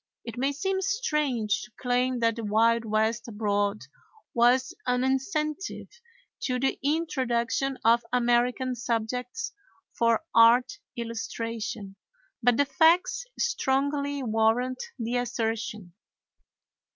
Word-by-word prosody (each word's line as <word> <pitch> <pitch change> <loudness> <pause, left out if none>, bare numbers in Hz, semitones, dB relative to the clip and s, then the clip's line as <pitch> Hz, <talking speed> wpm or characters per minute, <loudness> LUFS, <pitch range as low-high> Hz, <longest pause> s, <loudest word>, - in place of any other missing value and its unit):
It 230 -2 -6
may 270 +3 0
seem 380 +6 -1
strange 300 - 0
to 215 - -11
claim 250 0 0
that 230 -1 +2
the 230 - -5
Wild 225 +2 +2
West 220 +1 0
abroad 205 -2 -1 0.5
was 245 +3 +3
an 250 0 +2
incentive 305 +6 -2 0.5
to 255 - -1
the 270 +1 0
introduction 270 -4 0
of 235 +1 +5
American 245 +1 +2
subjects 250 - -3 0.4
for 230 +3 +2
art 230 +2 +5 0.2
illustration; 230 -3 -5 0.4
but 245 0 +3
the 285 - +4
facts 350 - +3
strongly 280 - 0
warrant 225 +3 +1 0.2
the 240 0 -2
assertion. 225 -5 -3
245 Hz, 105 wpm, -27 LUFS, 230-270 Hz, 0.5 s, of